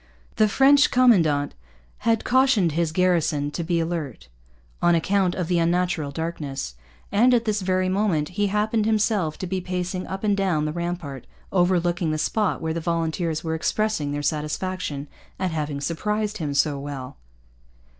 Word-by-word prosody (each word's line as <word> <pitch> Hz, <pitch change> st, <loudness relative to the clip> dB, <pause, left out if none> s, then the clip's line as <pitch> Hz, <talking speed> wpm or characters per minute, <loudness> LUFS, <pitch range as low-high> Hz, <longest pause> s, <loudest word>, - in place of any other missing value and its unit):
The 215 Hz, -, +5 dB
French 275 Hz, +6 st, +5 dB
commandant 165 Hz, -, +3 dB, 0.5 s
had 225 Hz, 0 st, +1 dB
cautioned 250 Hz, -, +3 dB
his 165 Hz, +1 st, 0 dB
garrison 160 Hz, -5 st, +1 dB
to 170 Hz, -, -3 dB
be 170 Hz, 0 st, 0 dB
alert, 160 Hz, -, -4 dB, 0.5 s
on 175 Hz, 0 st, +4 dB
account 185 Hz, +2 st, +1 dB
of 180 Hz, -3 st, -2 dB
the 175 Hz, -1 st, +2 dB
unusual 170 Hz, -3 st, 0 dB
darkness; 140 Hz, -, -4 dB, 0.4 s
and, 245 Hz, +5 st, +5 dB
at 235 Hz, -1 st, +1 dB
this 210 Hz, -2 st, 0 dB
very 185 Hz, 0 st, +1 dB
moment, 185 Hz, -6 st, +1 dB
he 205 Hz, +3 st, 0 dB
happened 210 Hz, +2 st, 0 dB
himself 210 Hz, -7 st, +1 dB
to -, -, -4 dB
be 185 Hz, +1 st, -2 dB
pacing 180 Hz, 0 st, -3 dB
up 190 Hz, +2 st, -5 dB
and 205 Hz, -1 st, +2 dB
down 185 Hz, -6 st, 0 dB
the 155 Hz, -, -2 dB
rampart 170 Hz, -6 st, -5 dB, 0.2 s
overlooking 175 Hz, -2 st, +1 dB
the 155 Hz, -, 0 dB
spot 210 Hz, +6 st, 0 dB
where 160 Hz, 0 st, -1 dB
the 165 Hz, -, -3 dB
volunteers 165 Hz, -1 st, -1 dB
were 160 Hz, -1 st, -2 dB
expressing 160 Hz, -2 st, -1 dB
their 145 Hz, 0 st, -3 dB
satisfaction 150 Hz, 0 st, -2 dB, 0.3 s
at 185 Hz, -2 st, -1 dB
having 150 Hz, -3 st, -3 dB
surprised 210 Hz, +8 st, -2 dB
him 145 Hz, -3 st, -3 dB
so 140 Hz, 0 st, +2 dB
well. 140 Hz, -2 st, -7 dB
175 Hz, 160 wpm, -24 LUFS, 155-200 Hz, 0.5 s, The